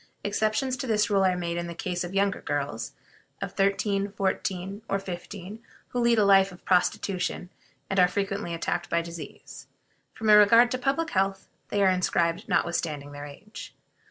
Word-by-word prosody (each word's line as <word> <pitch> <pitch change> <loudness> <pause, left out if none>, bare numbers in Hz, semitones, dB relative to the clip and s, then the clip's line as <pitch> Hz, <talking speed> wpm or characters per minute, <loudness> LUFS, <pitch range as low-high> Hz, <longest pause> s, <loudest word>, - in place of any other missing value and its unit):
Exceptions 215 +5 0
to 255 - -4
this 215 -1 +2
rule 195 -1 +4
are 185 -1 +2
made 170 -1 -2
in 170 0 -3
the 170 - -7
case 180 +1 -3
of 175 +2 -6
younger 200 -1 +1
girls 140 -6 -3 0.5
of - - -4
thirteen, 200 0 +1
fourteen, 195 0 -2
or 195 - +1
fifteen, 195 +2 -7 0.3
who 245 - -2
lead 235 -1 +3
a 210 - +4
life 195 -1 +5
of 180 - -15
prostitution, 180 0 0 0.4
and 195 - 0
are 180 - +7
frequently 195 -1 -2
attacked 170 +1 -2
by 170 - +2
disease. 170 -1 -10 0.5
From 220 -1 +2
a - - +10
regard 230 +4 +6
to 255 - -1
public 280 +5 0
health, 195 0 0 0.2
they 200 -1 +1
are 190 - +6
inscribed 180 +1 0
notwithstanding 155 -4 -1
their 145 0 -7
age. 200 +9 -11
195 Hz, 175 wpm, -27 LUFS, 175-210 Hz, 0.5 s, a